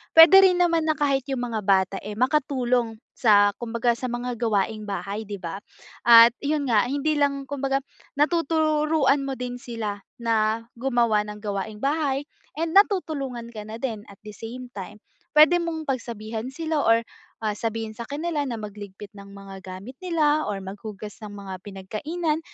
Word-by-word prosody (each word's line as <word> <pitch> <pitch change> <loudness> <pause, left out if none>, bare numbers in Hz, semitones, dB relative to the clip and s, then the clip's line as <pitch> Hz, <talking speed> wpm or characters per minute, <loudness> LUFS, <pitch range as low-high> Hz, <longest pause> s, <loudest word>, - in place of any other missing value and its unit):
Puwede 325 +3 +10
rin 365 -2 +4
naman 335 -2 +2
na 310 - +2
kahit 275 -2 +2
'yung 265 - -1
mga 230 -3 -2
bata, 190 -1 +2
eh, 210 - -6
makatulong 250 -3 +1 0.2
sa 205 -3 +5
kumbaga 235 0 0
sa 255 - -3
mga 240 0 -3
gawaing 215 -1 0
bahay, 200 +2 -4
'di 205 -1 -5
ba? 175 +2 -5 0.5
At 230 0 +9
yun 290 -1 0
nga 220 -1 +4
hindi 285 +3 0
lang 280 -1 0
kumbaga 275 -1 -1 0.4
natuturuan 305 -2 +2
mo 275 - -2
din 245 0 -4
sila 215 -4 -5 0.2
na 225 0 +1
gumawa 235 -4 +2
ng 210 0 -7
gawaing 205 0 -4
bahay 280 -1 0 0.4
and 330 0 -1
natutulungan 285 - +1
ka 215 -2 -6
na 220 +1 -6
din 225 -6 -3
at 200 - -16
the 210 - -8
same 245 +3 -8
time. 200 +1 -8 0.4
Puwede 310 +3 +8
mong 325 -2 -3
pagsabihan 230 -2 -4
sila 315 +1 -1
or, 230 -2 +4 0.4
ah, 210 - +1
sabihin 225 0 -3
sa 235 +1 -7
kanila 305 +2 -2
na 240 -4 -3
magligpit 205 -1 -9
ng 200 -1 -12
mga 195 -1 -11
gamit 190 +6 -8
nila 310 -4 +2
or 205 - -2
maghugas 205 +1 -8
ng 215 - -7
mga 200 -2 -8
pinagkainan. 300 - -3
240 Hz, 165 wpm, -25 LUFS, 210-290 Hz, 0.5 s, Puwede